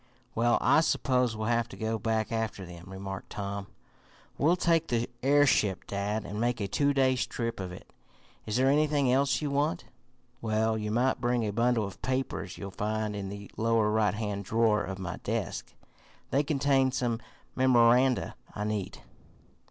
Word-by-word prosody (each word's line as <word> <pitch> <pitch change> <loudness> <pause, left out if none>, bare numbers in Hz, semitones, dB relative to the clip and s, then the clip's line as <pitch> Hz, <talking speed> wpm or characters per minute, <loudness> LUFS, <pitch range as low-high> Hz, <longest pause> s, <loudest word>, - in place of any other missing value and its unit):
"Well, 120 +1 +3
I - - +5
suppose 125 -7 +1
we'll 110 +1 -2
have 120 -1 +1
to - - -10
go 110 0 -2
back 110 +1 -1
after 110 -4 -2
them," 85 0 -11
remarked 95 0 -7
Tom. 100 -1 -5 0.7
"We'll 160 +5 +3
take 165 -2 +2
the 120 0 0
airship, 135 -8 +3
dad, 100 +2 -2
and 105 +2 -4
make 120 0 0
a 100 - -1
two 140 +8 +2
days' 130 -2 +2
trip 115 -3 -3
of 95 -1 -4
it. 90 - -12 0.5
Is 105 - -2
there 130 +2 +3
anything 145 -2 +3
else 140 +3 +2
you 145 - -1
want?" 150 +5 0 0.6
"Well, 110 0 +1
you 105 -1 -3
might 125 +4 +1
bring 120 -1 +1
a 105 - -1
bundle 115 0 +2
of 100 - -9
papers 130 -7 -2
you'll 100 -1 -6
find 105 +1 -2
in 100 -1 -4
the 100 0 -8
lower 110 -1 +2
right 105 -1 +2
hand 105 -2 -3
drawer 110 +1 +2
of 95 - -5
my 95 -3 -5
desk. - - -3 0.6
They 140 - +3
contain 140 -2 +2
some 120 -3 -1 0.4
memoranda 125 0 +4 0.2
I 105 - -3
need." 105 -3 -3
115 Hz, 170 wpm, -29 LUFS, 105-130 Hz, 0.7 s, I